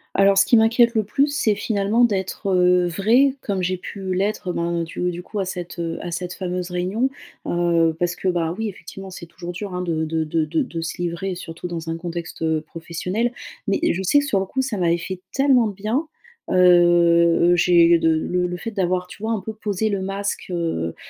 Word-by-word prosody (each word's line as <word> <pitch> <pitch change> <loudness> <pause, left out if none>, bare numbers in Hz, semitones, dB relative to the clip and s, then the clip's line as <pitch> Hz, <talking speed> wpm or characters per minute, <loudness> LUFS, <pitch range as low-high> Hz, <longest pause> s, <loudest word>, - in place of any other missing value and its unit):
Alors, 195 0 +4
ce - - +6
qui 235 - +5
m'inquiète 235 +2 +4
le 220 - +2
plus 275 +8 +1
c'est 285 -8 +1
finalement, 205 +2 +1
d'être, 195 -1 -2
heu, 180 0 +4
vraie 235 +10 +3
comme 195 -3 -2
j'ai 185 +1 -1
pu 190 +1 -5
l'être, 195 -1 -1
ben, 170 0 -1
du 175 +2 -3
du 175 0 -6
coup, 210 - -5
à 195 - 0
cette, 180 -2 -6
heu, 165 -1 -3
à 175 - -5
cette 180 +1 -4
fameuse 180 -1 -4
réunion, 190 +9 0 0.4
heu, 170 -2 +2
parce 175 0 0
que 190 - -4
bah 170 -2 0
oui, 220 -1 -2
effectivement, 195 0 -10
c'est 180 -1 -9
toujours 170 +1 -8
dur, 190 +2 -6
hein, 180 - -2
de 165 -3 -1
de 160 0 -1
de 155 0 0
de 165 +1 -2
se 165 +1 -5
livrer 175 +2 -3
surtout 170 0 -7
dans 165 -2 -5
un 165 - -2
contexte, 170 -1 -6
heu, 160 -1 +1
professionnel. 180 +8 -3 0.4
Mais, 200 - +1
je 180 - -3
sais 285 +10 +4
que 285 - -2
sur 205 -9 +1
le 190 - -1
coup, 265 +7 -2
ça 260 -5 -3
m'avait 170 -2 +2
fait 185 +1 -6
tellement 270 -4 +4
de 205 - -4
bien. 220 - -2 0.4
Heu, - - 0 1.0
heu, - - +5
j'ai 170 -1 +5
de 165 - +2
le 180 +3 0
le 180 0 -4
fait 225 +5 -5
d'avoir, 185 -3 -1
tu 190 - -13
vois, 225 +1 -1
un 215 - -2
peu 220 +4 -6
posé 210 0 -2
le 200 -2 -1
masque, 195 +1 -3
heu, 165 - -2
180 Hz, 220 wpm, -22 LUFS, 170-205 Hz, 1.0 s, ce